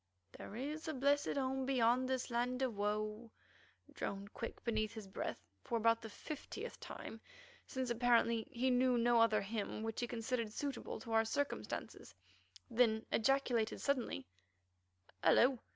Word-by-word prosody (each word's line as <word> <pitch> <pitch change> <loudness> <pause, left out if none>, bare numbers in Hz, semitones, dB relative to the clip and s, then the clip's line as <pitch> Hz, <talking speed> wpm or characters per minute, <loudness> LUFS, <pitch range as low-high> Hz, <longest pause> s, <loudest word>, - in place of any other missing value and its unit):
"There 205 - -8
is 300 +7 -4
a 315 - -2
blessed 280 +2 +2
home 265 -1 0
beyond 255 0 +3
this 260 -1 -1
land 250 +2 0
of 250 -4 0
woe" 210 +2 -1 0.6
droned 200 +1 -4
Quick 230 - -6
beneath 215 -2 0
his 220 -2 -6
breath 190 - -4 0.2
for 235 - -1
about 230 0 +3
the 225 - -7
fiftieth 295 +7 -7
time, 225 - -8 0.5
since, 260 -2 -2
apparently, 235 -1 +3
he 255 +2 +1
knew 250 0 +4
no 235 0 +4
other 220 -2 +4
hymn 215 +1 -3
which 225 -1 -3
he 240 - -1
considered 235 -1 -2
suitable 275 0 -4
to 230 - -7
our 225 0 +5
circumstances, 285 +6 -3 0.5
then 225 -2 +3
ejaculated 240 -2 +2
suddenly: 250 - -1 1.0
"Hullo! 255 0 +5
235 Hz, 145 wpm, -37 LUFS, 220-260 Hz, 1.0 s, our